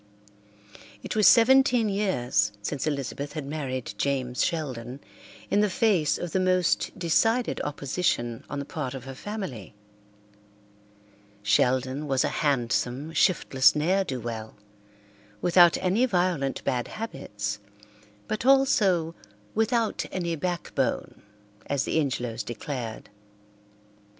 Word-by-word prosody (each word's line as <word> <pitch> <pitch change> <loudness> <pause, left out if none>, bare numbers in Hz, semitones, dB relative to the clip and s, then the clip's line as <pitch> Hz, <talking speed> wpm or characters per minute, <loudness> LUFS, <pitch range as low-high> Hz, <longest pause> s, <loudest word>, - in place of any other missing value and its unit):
It - - -4
was 215 -1 +5
seventeen 255 -1 +5
years 125 - 0
since 145 +7 -2
Elizabeth 140 0 -3
had 150 -2 -5
married 135 -4 -4
James 130 -3 0
Sheldon 130 -6 -3 0.5
in 205 - +3
the 210 0 +3
face 185 -7 +2
of 175 - -5
the 190 - +1
most 185 -1 +1
decided 225 +7 +1
opposition 140 -5 -2
on 145 - -4
the 140 - -4
part 140 -3 -4
of 130 - -7
her 135 +1 -8
family. 135 - -6 1.7
Sheldon 130 +7 +1
was 135 -1 +2
a - - +1
handsome, 135 +1 0
shiftless 135 -7 +3
ne'er 180 +6 +2
do 130 -8 -4
well, 110 -2 -6 0.8
without 175 - +5
any 205 +8 +2
violent 175 - 0
bad 125 -2 -1
habits, 105 - -5 0.7
but 215 - -3
also 215 -11 +3 0.4
"without 225 0 +1
any 170 -2 -2
backbone," 175 +2 -2 0.5
as 140 -1 0
the - - 0
Ingelows 125 -5 -2
declared. 120 -1 -6
150 Hz, 115 wpm, -26 LUFS, 130-190 Hz, 1.7 s, was